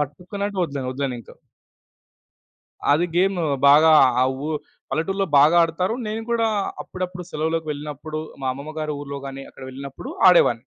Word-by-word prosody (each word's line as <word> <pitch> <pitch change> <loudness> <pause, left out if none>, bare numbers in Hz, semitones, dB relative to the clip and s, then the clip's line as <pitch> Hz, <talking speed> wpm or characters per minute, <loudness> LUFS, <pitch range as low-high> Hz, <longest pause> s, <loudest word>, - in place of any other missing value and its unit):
పట్టుకున్నంటే 190 +8 -4
వదలను 140 -5 -3
వదిలనింక. 130 -3 -4 1.6
అది 170 +4 +2
గేమ్ 190 +2 +2 0.3
బాగా 155 +3 +7 0.3
ఆ - - +5 0.2
ఉ - - -3 0.4
పల్లెటూరులో 195 +5 -1
బాగా 150 +5 +6
ఆడతారు. 180 +6 0
నేను 220 +1 -3
కూడా 230 -1 +2 0.3
అప్పుడప్పుడు 180 -1 -6
సెలవుకి 160 +1 -2
వెళ్ళినప్పుడు, 150 +1 -6 0.2
మా - - -2
అమ్మమ్మ 140 +4 -8
గారి 155 -1 -2
ఊర్లో 140 -1 -6
గాని 135 0 -8
అక్కడికి 130 -1 -10
వెళ్ళినప్పుడు 135 +1 -8 0.2
ఆడేవాడిని. 120 -10 +4
155 Hz, 135 wpm, -22 LUFS, 140-180 Hz, 1.6 s, బాగా